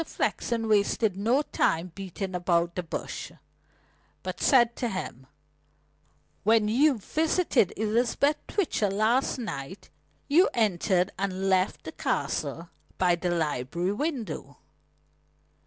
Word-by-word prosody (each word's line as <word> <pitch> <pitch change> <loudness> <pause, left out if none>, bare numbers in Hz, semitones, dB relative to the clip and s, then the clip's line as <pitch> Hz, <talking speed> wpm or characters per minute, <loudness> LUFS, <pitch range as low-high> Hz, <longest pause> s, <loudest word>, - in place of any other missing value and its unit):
Flexen 230 -7 -2
wasted 210 -1 +2
no 235 +9 +2
time 170 - 0
beating 190 0 -6
about 175 -1 +1
the 180 - -2
bush, 170 - -6 0.9
but - - -5
said 240 -3 +4
to 240 - -1
him: 135 - -6 1.1
"When 220 0 +3
you 265 +5 +3
visited 310 - +1
Elizabeth 235 +7 +1
Twitcher 315 - 0
last 220 +8 +1
night 190 - -6 0.4
you 330 +6 +5
entered 190 -4 +2
and 195 -1 -2
left 190 0 +1
the 160 - -6
Castle 150 +3 -2 0.3
by 180 -2 +3
the 175 +1 -1
library 165 +1 -1
window." 275 -1 -4
200 Hz, 110 wpm, -27 LUFS, 175-235 Hz, 1.1 s, you